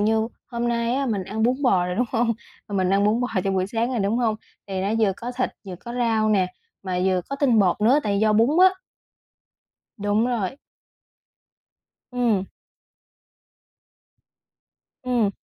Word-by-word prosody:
như 220 +1 +2 0.2
hôm 240 -1 -2
nay 235 0 0
á, 275 0 0
mình 205 -5 -1
ăn 215 +4 -3
bún 245 +3 +3
bò 185 -8 +3
rồi, 180 - -2
đúng 245 +2 +1
không? 230 0 +2 0.4
Mình 190 -2 0
ăn 200 +1 +3
bún 215 +3 +2
bò 245 - 0 0.2
trong 195 -1 0
buổi 185 0 +1
sáng 230 +4 -1
rồi, 250 - -1
đúng 210 +3 0
không? 225 -3 +1 0.3
Thì 190 -1 -2
nó 195 - -1
vừa 210 -4 +3
có 245 +1 -6
thịt, 250 +1 -1 0.2
vừa 185 -2 -6
có 235 +6 -9
rau 225 -3 +1
nè, 195 -4 +3 0.4
mà 185 -2 -2
vừa 185 -1 +2
có 275 - -2
tinh 265 -5 +3
bột 195 -1 +2
nữa, 240 +7 +5
tại 200 -4 0
do 215 0 +3
bún 225 +3 +4 0.2
á. 375 0 +5 1.2
Đúng 205 +2 +1
rồi. 240 -1 -2 1.5
Ừm. 235 -6 +1 2.6
Ừm. 240 -5 +1
220 Hz, 170 wpm, -23 LUFS, 195-240 Hz, 2.6 s, nữa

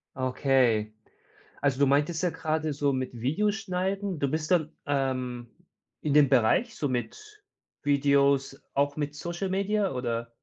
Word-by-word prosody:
Okay. 130 -5 +1 0.7
Also, 140 -1 +1
du 140 - +5
meintest 145 +4 +1
ja 180 - +2
gerade 155 -1 -2
so 140 0 0
mit 130 -1 -2
Videos 200 - +1
schneiden 190 -2 -2
du 140 - 0
bist 155 +3 -2
dann, 165 -4 +2 0.2
ähm, 130 -4 -2 0.5
in 150 -2 0
dem 145 -2 +6
Bereich 135 - +2
so 145 - -1
mit 270 - -5 0.4
Videos 140 -1 +2
auch 140 0 +1
mit 145 -1 -3
Social 175 +5 -4
Media 200 0 0
oder? 120 -2 -3
145 Hz, 145 wpm, -27 LUFS, 130-175 Hz, 0.7 s, dem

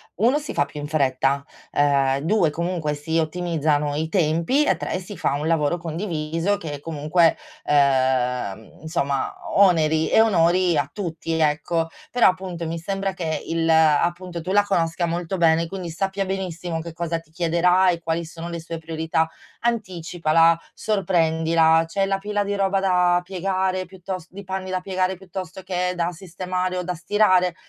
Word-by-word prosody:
1 240 - +3
si 300 - -6
fa 140 - +2
più 150 +1 -9
in 145 - -5
fretta, 140 -2 +1 0.3
uhm, 140 -2 +2
2 175 +1 +2
comunque 165 -1 -2
si 160 +3 -1
ottimizzano 155 -3 0
i 160 +2 -2
tempi, 170 - +2
e 190 - +3
3 - - -3
si 190 +2 -9
fa - - 0
un 145 +2 -2
lavoro 160 0 +1
condiviso 165 +1 -2
che 150 -5 -6
comunque, 160 +2 +2 0.3
uhm, 130 -6 +1
insomma 140 -4 -1 0.2
o 200 - +6
oneri 160 -3 +2
e - - +5
onori 180 -4 +3
a 145 -2 0
tutti, 165 -4 -4
ecco. 160 +1 +1 0.2
Però 245 - +4
appunto 185 -2 -4
mi 165 +1 -3
sembra 195 +2 -2
che 165 -4 -3
il 165 0 -1
appunto 170 +3 +2
tu 180 +4 -4
la 205 +1 +5
conosca 175 -3 0
molto 170 +2 -2
bene 165 -1 +3
quindi 185 -1 -6
sappia 195 +3 -2
benissimo 180 -3 -3
che 165 0 -8
cosa 165 0 -2
ti 165 - -22
chiederà 175 +3 +3
e 170 -2 0
quali 165 0 -2
sono 165 +1 -8
le 170 0 -4
sue 165 0 -6
priorità. 160 0 -1 0.4
Anticipala, 170 -6 +2
sorprendila, 165 -5 +2
c'è 195 +4 0
la 195 0 +1
pila 205 +1 -1
di 205 0 -2
roba 195 -1 +1
da 180 -2 +3
piegare 185 0 -1
piuttos 185 -1 -7
di 200 +2 -9
panni 190 0 -4
da 185 -1 -1
piegare, 185 0 -1
piuttosto 185 0 -8
che 180 -1 -1
da 175 0 -1
sistemare 185 +1 -3
o 180 - -2
da 180 0 -2
stirare? 180 0 +2
170 Hz, 165 wpm, -23 LUFS, 160-185 Hz, 0.4 s, o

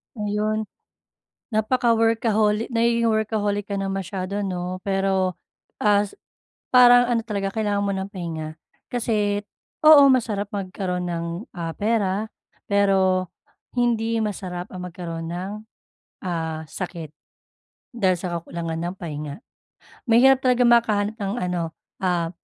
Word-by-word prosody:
Ayun. 210 0 -1 0.9
Napaka-workaholi 225 -1 +2
nagiging 235 0 +2
workaholic 215 -2 0
ka 200 - -1
na 195 0 -2
masyado 195 +1 -3
'no, 180 -1 -3
pero 195 -1 +1 0.5
as 205 -1 +3 0.6
parang 245 -1 +8
ano 235 -2 +2
talaga, 200 -3 -2
kailangan 205 -2 0
mo 200 - 0
ng 190 +1 -4
pahinga 160 -4 -5 0.3
kasi, 210 -4 0 0.4
oo 305 -2 +10
masarap 215 -5 0
magkaroon 185 -2 -3
ng, 170 -1 -2 0.3
ah, 165 -2 -3
pera, 210 -1 0 0.4
pero 190 -2 +3 0.5
hindi 230 -1 +1
masarap 185 -4 -4
ang 185 -1 -7
magkaroon 165 -2 -6
ng, 180 +3 -4 0.7
ah, 160 -3 -3
sakit 170 -2 -6 0.8
dahil 190 -6 +2
sa 175 -1 -3
kakulangan 165 -1 -5
ng - - -8
pahinga. 150 -4 -5 0.7
Mahirap 255 +3 +6
talagang 250 -1 +4
makahanap 220 -3 +3
ng 200 -1 -2
ano, 175 -2 -2 0.3
ah, 175 -2 +1
200 Hz, 115 wpm, -23 LUFS, 180-220 Hz, 0.9 s, oo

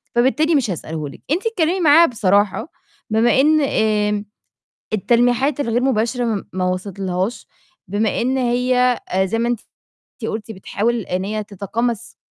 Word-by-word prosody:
فبالتالي 305 +7 +3
مش 250 -8 +1
هاسأله 155 -3 -5
لِك." - - -13
أنتِ 355 +8 0
اتكلمي 370 -4 0
معاها 325 +1 +7
بصراحة 205 - +1 0.4
بمِا 230 +4 +3
إن، 310 +2 +4
آمم 210 -5 +1 0.7
التلميحات 245 +6 +2
الغير 240 -3 0
مباشرة 245 -1 +1
م 215 -4 -2
ما 185 0 -1
وصلتلهاش، 185 +2 -3 0.4
بمِا 205 +3 0
إن 260 +3 0
هي، 250 0 +2
أ 190 +1 +1
زي 225 +4 -1
ما 235 +1 0
أنتِ 240 - -1 0.6
أنتِ 225 - -2
قُلتِ 220 +1 -5
بتحاول 220 +4 -2
إن 185 -1 -3
هي 215 +1 -3
تتقمص 215 +3 -3
230 Hz, 145 wpm, -20 LUFS, 200-255 Hz, 0.7 s, معاها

